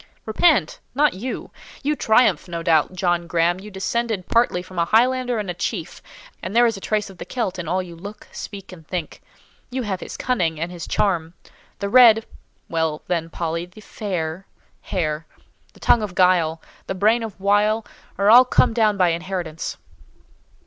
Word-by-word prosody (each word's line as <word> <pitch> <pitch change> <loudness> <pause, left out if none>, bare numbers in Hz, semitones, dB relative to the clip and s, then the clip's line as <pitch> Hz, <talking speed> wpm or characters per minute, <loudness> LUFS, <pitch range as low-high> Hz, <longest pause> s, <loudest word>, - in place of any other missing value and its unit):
"Repent! 230 - +2 0.2
Not 295 +1 +3
you! 240 +7 -5 0.3
You 300 +2 +1
triumph, 220 - +3
no 170 -1 -5
doubt: 160 +1 +3
John 175 -2 0
Graham, 170 +1 +1
you 205 +2 -10
descended 205 0 -2
partly 230 -6 +2
from 185 -1 -7
a 170 - +3
Highlander 250 +4 +2
and 210 -2 -3
a 180 - -2
chief, 175 0 -4 0.4
and 185 +5 -5
there 240 +1 +6
is 230 -2 +1
a 195 - -9
trace 210 -1 -1
of 185 - -17
the - - -4
Celt 195 -7 -2
in 170 - -5
all 185 +3 0
you 175 -2 -10
look, 205 +5 -10
speak, 195 -2 -8
and 165 -4 -13
think. 175 -4 -5 0.5
You 255 0 -3
have 195 -4 -3
his - - -8
cunning 175 -11 0
and 170 +2 -3
his 175 -2 -7
charm. 170 -4 0 0.4
The 200 - -3
red—(Well 215 -9 +2
then, 165 -2 -2
Polly, 165 +1 -3
the 180 +4 -15
fair) 185 -4 -4 0.3
hair, 160 -3 -2 0.5
the - - -19
tongue 235 - +4
of 205 -4 -5
guile, 170 -4 +3 0.2
and 190 - -4
brain 220 +4 +4
of 220 -4 -7
wile, 210 +3 +2 0.3
are 200 +2 +4
all 245 +2 +10
come 250 - +3
down 215 -3 +2
by 180 -2 +4
inheritance." 170 -2 -4
190 Hz, 175 wpm, -22 LUFS, 170-220 Hz, 0.5 s, all